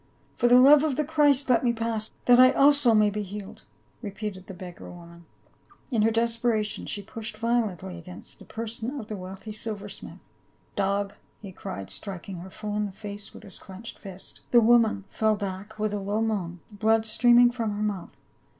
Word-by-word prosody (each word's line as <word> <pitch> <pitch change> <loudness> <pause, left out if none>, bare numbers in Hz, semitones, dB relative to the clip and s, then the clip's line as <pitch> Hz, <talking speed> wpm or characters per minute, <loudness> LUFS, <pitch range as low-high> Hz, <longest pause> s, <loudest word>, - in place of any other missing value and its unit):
"For 240 - +2
the 245 +1 +7
love 280 +3 +7
of 305 -4 0
the 300 - +1
Christ, 290 -3 +3
let 250 -2 +3
me 240 -1 +2
pass 225 -1 -2
— - - -37
that 245 0 +6
I 255 0 +8
also 280 -4 +5
may 210 -1 +4
be 210 +1 -3
healed," 200 0 -8 0.4
repeated 200 -3 -6
the 195 - -8
beggar 180 -1 -10
woman; 170 -1 -13 0.7
in 230 -4 +2
her 220 - +4
desperation 230 -1 0
she 205 - -4
pushed 220 +1 -7
violently 215 -6 -1
against 180 +2 -12
the - - -13
per 230 +1 -5
son 230 +5 -5
of 220 - -9
the 215 - -4
wealthy 190 +3 -8
silver 210 -1 -5
smith. 200 - -9 0.6
"Dog!" 200 0 0 0.3
he 200 -3 -9
cried, 100 - -7
striking 195 -2 -6
her 180 +3 -9
full 210 +2 -5
in 210 0 0
the - - -9
face 205 0 -8
with - - -13
his 195 - -10
clenched 195 +4 -10
fist. 190 -2 -10
The 240 - +6
woman 225 -3 +4
fell 220 +1 +1
back 200 +1 -6
with 215 -1 -1
a 205 - -1
low 200 +2 -2
moan, 180 -6 -3
blood 220 +2 +2
streaming 240 +2 +5
from 230 -3 -2
her 210 - -2
mouth. 200 -4 -3
215 Hz, 195 wpm, -26 LUFS, 195-230 Hz, 0.7 s, I